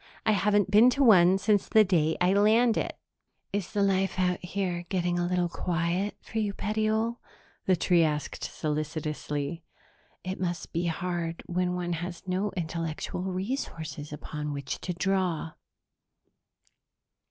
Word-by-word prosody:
I -, -, +4 dB
haven't 205 Hz, -1 st, +2 dB
been 220 Hz, +4 st, +7 dB
to 280 Hz, -, +4 dB
one 190 Hz, -6 st, +7 dB
since 205 Hz, 0 st, +1 dB
the 220 Hz, -, +6 dB
day 160 Hz, -5 st, +2 dB
I 180 Hz, +1 st, +3 dB
landed." 220 Hz, +3 st, +3 dB, 0.6 s
"Is 200 Hz, -3 st, -2 dB
the 205 Hz, -, +1 dB
life 195 Hz, -1 st, +1 dB
out 180 Hz, -1 st, 0 dB
here 180 Hz, -1 st, -2 dB
getting 175 Hz, -2 st, 0 dB
a 175 Hz, -, 0 dB
little 180 Hz, -1 st, +1 dB
quiet 175 Hz, +3 st, -1 dB
for 225 Hz, -, -4 dB
you, 205 Hz, -2 st, -1 dB
petiole?" 220 Hz, +2 st, 0 dB, 0.5 s
the 185 Hz, -, +5 dB
tree 175 Hz, 0 st, +3 dB
asked 150 Hz, -2 st, -2 dB
solicitously. 155 Hz, 0 st, -3 dB, 0.6 s
"It 185 Hz, +1 st, -4 dB
must 175 Hz, -3 st, -3 dB
be 170 Hz, +1 st, 0 dB
hard 170 Hz, 0 st, -3 dB
when 180 Hz, 0 st, -1 dB
one 175 Hz, -1 st, -2 dB
has 175 Hz, +2 st, -5 dB
no 190 Hz, +3 st, 0 dB
intellectual 165 Hz, 0 st, -3 dB
resources 185 Hz, -, -4 dB
upon 150 Hz, 0 st, -5 dB
which 140 Hz, -1 st, -5 dB
to 180 Hz, -, -3 dB
draw." 180 Hz, -3 st, 0 dB
180 Hz, 140 wpm, -28 LUFS, 165-200 Hz, 0.6 s, been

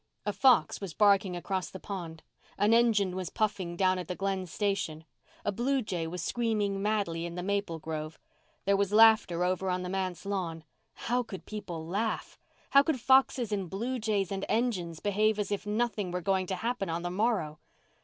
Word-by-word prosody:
A 205 Hz, -, -1 dB
fox 260 Hz, -3 st, +4 dB
was 190 Hz, -6 st, -6 dB
barking 200 Hz, -3 st, +4 dB
across 185 Hz, +1 st, -3 dB
the 190 Hz, -, -9 dB
pond; 170 Hz, -6 st, -7 dB, 0.3 s
an 210 Hz, +2 st, +3 dB
engine 215 Hz, -6 st, +3 dB
was 185 Hz, -2 st, -3 dB
puffing 195 Hz, -6 st, -1 dB
down 185 Hz, -1 st, +2 dB
at 180 Hz, -, -6 dB
the 180 Hz, -, -3 dB
Glen 195 Hz, -1 st, -2 dB
station; 175 Hz, -5 st, -2 dB, 0.4 s
a 205 Hz, -, +1 dB
blue 255 Hz, +5 st, 0 dB
jay 175 Hz, -6 st, -3 dB
was 180 Hz, +2 st, -5 dB
screaming 210 Hz, -4 st, 0 dB
madly 200 Hz, -6 st, 0 dB
in 170 Hz, -, -8 dB
the 180 Hz, -, -4 dB
maple 200 Hz, -3 st, -1 dB
grove; 155 Hz, 0 st, -5 dB, 0.5 s
there 200 Hz, +1 st, +4 dB
was 200 Hz, 0 st, +1 dB
laughter 215 Hz, -5 st, +5 dB
over 185 Hz, +1 st, 0 dB
on 180 Hz, 0 st, -1 dB
the 180 Hz, -, -4 dB
manse 185 Hz, -2 st, -3 dB
lawn. 175 Hz, -5 st, -3 dB, 0.4 s
How 245 Hz, +2 st, +2 dB
could 205 Hz, -6 st, -8 dB
people 185 Hz, -7 st, -6 dB
laugh? 205 Hz, +7 st, -2 dB, 0.3 s
How 275 Hz, -, +8 dB
could 285 Hz, -2 st, -1 dB
foxes 260 Hz, -2 st, +3 dB
and 195 Hz, -4 st, -2 dB
blue 240 Hz, +7 st, -3 dB
jays 210 Hz, -4 st, 0 dB
and 195 Hz, 0 st, -3 dB
engines 185 Hz, -9 st, 0 dB
behave 210 Hz, +1 st, +2 dB
as 210 Hz, -1 st, -2 dB
if 205 Hz, +1 st, -2 dB
nothing 215 Hz, -2 st, -1 dB
were 180 Hz, +1 st, -3 dB
going 190 Hz, 0 st, +1 dB
to 190 Hz, -, -1 dB
happen 225 Hz, -1 st, -2 dB
on 165 Hz, +1 st, -2 dB
the 175 Hz, -, -2 dB
morrow? 190 Hz, -7 st, 0 dB
195 Hz, 190 wpm, -30 LUFS, 180-215 Hz, 0.5 s, How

